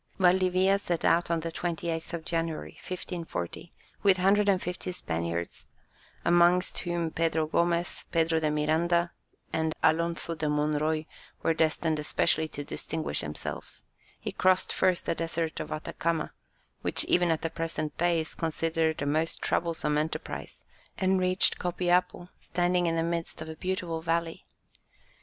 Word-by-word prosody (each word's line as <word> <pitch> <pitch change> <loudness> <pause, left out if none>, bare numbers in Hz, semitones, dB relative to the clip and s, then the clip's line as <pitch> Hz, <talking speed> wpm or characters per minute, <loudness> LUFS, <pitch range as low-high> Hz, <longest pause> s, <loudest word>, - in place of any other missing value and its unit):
Valdivia 185 +1 +4
set 175 -4 -2
out 170 +1 +3
on 170 -1 +1
the 165 +1 -3
28th 165 -1 -3
of 165 -1 -4
January, 165 -2 -2
1540, 170 - -5 0.3
with 195 -2 +5
150 190 -2 +2
Spaniards, 85 - -3 0.6
amongst 175 +1 +4
whom 170 -2 -1
Pedro 160 -1 +1
Gomez, 170 +2 0
Pedro 165 -1 +2
de 155 -1 +1
Miranda, 165 +3 +2 0.4
and 160 -1 0
Alonzo 170 +1 +2
de 155 -2 -2
Monroy 150 +1 +1 0.4
were 165 - +3
destined 160 0 +1
especially 155 +1 +1
to 145 -2 -6
distinguish 155 +2 -3
themselves; 75 +1 -5 0.4
he - - -4
crossed 185 0 +2
first 185 -2 +2
the - - +1
desert 165 0 -2
of - - -5
Atacama, 160 +1 -2 0.5
which - - 0
even 175 -1 +3
at 160 -1 +1
the 165 - -1
present 160 -2 -3
day 175 -1 +3
is 160 - -6
considered 160 -1 0
a - - -1
most 155 +3 0
troublesome 160 -3 0
enterprise, 155 +2 -4 0.3
and 190 0 +2
reached 185 0 +2
Copiapo, 180 0 +1
standing 175 0 +1
in 165 - +1
the 165 - +1
midst 170 0 -2
of 155 0 -6
a 160 - -6
beautiful 175 -1 -2
valley. 165 0 -1
165 Hz, 140 wpm, -29 LUFS, 160-175 Hz, 0.6 s, with